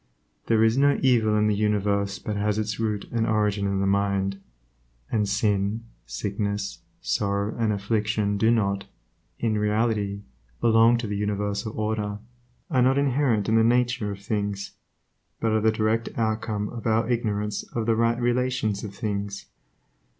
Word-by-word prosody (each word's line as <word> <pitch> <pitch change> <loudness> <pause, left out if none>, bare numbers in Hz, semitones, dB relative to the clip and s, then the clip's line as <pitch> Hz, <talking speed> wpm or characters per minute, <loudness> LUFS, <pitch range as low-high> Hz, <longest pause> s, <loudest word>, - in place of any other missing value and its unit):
There 110 -1 +4
is 115 +4 +3
no 140 0 +4
evil 110 -5 +3
in 105 - +3
the 105 - +3
universe 100 -1 0
but 105 - -4
has 105 0 0
its 110 0 -2
root 105 -2 -1
and 115 -1 0
origin 105 -2 +1
in 100 0 0
the - - +1
mind, 100 0 0 0.7
and 105 -3 +1
sin, 105 +1 0 0.2
sickness, 100 0 -3 0.2
sorrow, 100 +1 -1
and 115 -2 +1
affliction 105 0 0
do 110 - +4
not, 100 -4 +1 0.5
in 110 -2 0
reality, 105 -1 0 0.4
belong 115 +1 +5
to 120 - -4
the 105 -1 -3
universal 105 +1 -2
order, 105 -1 -1 0.5
are 130 - +3
not 130 +2 +4
inherent 135 -6 +2
in 110 0 +3
the 110 - +5
nature 120 -2 +2
of 100 0 -8
things, 100 -1 -2 0.7
but 115 - +1
are 110 0 +2
the 110 +1 +4
direct 110 +1 0
outcome 110 -2 -1
of 115 -2 -6
our 110 0 +2
ignorance 105 -3 -1
of 115 -2 -4
the 115 0 +2
right 115 +1 +2
relations 120 -4 0
of 100 -2 -7
things. 100 -2 -3
105 Hz, 155 wpm, -25 LUFS, 100-115 Hz, 0.7 s, belong